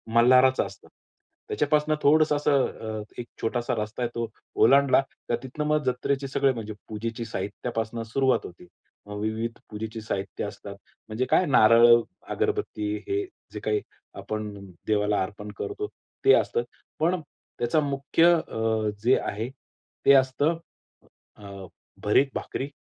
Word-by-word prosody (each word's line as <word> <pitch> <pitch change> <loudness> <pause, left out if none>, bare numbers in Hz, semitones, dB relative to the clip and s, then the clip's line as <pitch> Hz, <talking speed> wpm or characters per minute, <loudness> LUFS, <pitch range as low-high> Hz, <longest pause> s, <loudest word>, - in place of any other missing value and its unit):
मल्हाराचं 130 +2 +5
असतं. - - -12 0.6
त्याच्यापासून 150 +1 +1
थोडंसं 155 +1 +5
अ, - - +1
असं 120 -7 0
एक 120 - -6
छोटासा 120 +1 -1
रस्ता 110 +3 -5
आहे. 120 - 0
तो 115 -1 -1 0.3
ओलांडला 140 +2 +5 0.3
तर 120 - +3
तिथनं 135 +4 -4
मग 150 0 +2
जत्रेचे 135 +2 -1
सगळे 135 0 +2
म्हणजे 110 -3 -6 0.2
पूजेची 115 +2 -4
साहित्यापासून 115 +1 -4
सुरुवात 130 +4 +2
होते. 90 0 -12 0.4
विविध 110 +3 -3
पूजेचे 110 +1 -6
साहित्य 100 -2 -4
असतात. 100 -1 -8 0.3
म्हणजे 115 +4 -1
काय, 185 - +5
नारळ, 115 -5 +6 0.4
अगरबत्ती 415 - -1
हे 395 0 0 0.3
जे - - -5
काही 420 -1 0 0.4
आपण 105 -1 -4 0.3
देवाला 105 -1 +2
अर्पण 105 +2 -7
करतो, 415 +1 -4 0.4
ते 405 - +8
असतात. 465 - +1 0.4
पण 175 +3 +2 0.4
त्याचा 120 +6 +2
मुख्य 145 +4 +3
अ, 110 -1 0
जे 125 +3 +5
आहे 110 +4 -3 0.6
ते 140 - +8
असतं 140 +4 +3 0.8
अ, 100 -2 -10 0.4
भरीत 105 +7 +4
भाकरी 135 - -3
120 Hz, 130 wpm, -26 LUFS, 110-140 Hz, 0.8 s, ते